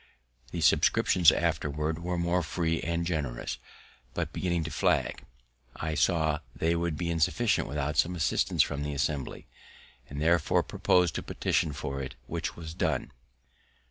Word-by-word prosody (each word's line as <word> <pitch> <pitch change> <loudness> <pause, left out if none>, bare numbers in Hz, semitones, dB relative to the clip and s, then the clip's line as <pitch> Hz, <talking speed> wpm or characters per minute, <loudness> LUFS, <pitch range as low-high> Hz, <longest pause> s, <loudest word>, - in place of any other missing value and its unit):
The - - -4
subscriptions 85 -4 +5
afterwards 75 +2 -1
were 90 +1 -2
more 85 +1 +1
free 80 -1 -1
and 85 0 -1
generous; 75 -8 -3 0.6
but, - - -2
beginning 85 -3 0
to 80 - -5
flag, - - +1 0.5
I 80 0 -3
saw 80 -2 +2 0.2
they 85 +1 +1
would 85 -2 -1
be 85 +1 -1
insufficient 95 +7 +1
without 75 +1 -2
some 90 +4 +3
assistance 80 -3 +2
from 70 - -4
the 75 0 -3
Assembly, 70 -1 -2 0.6
and 70 - -6
therefore 85 +1 +3
propos'd 90 -3 +2
to - - -3
petition 75 - 0
for 70 -1 -4
it, 65 - -6
which - - -4
was 80 -2 -7
done. 80 -6 -1
80 Hz, 145 wpm, -29 LUFS, 75-85 Hz, 0.6 s, subscriptions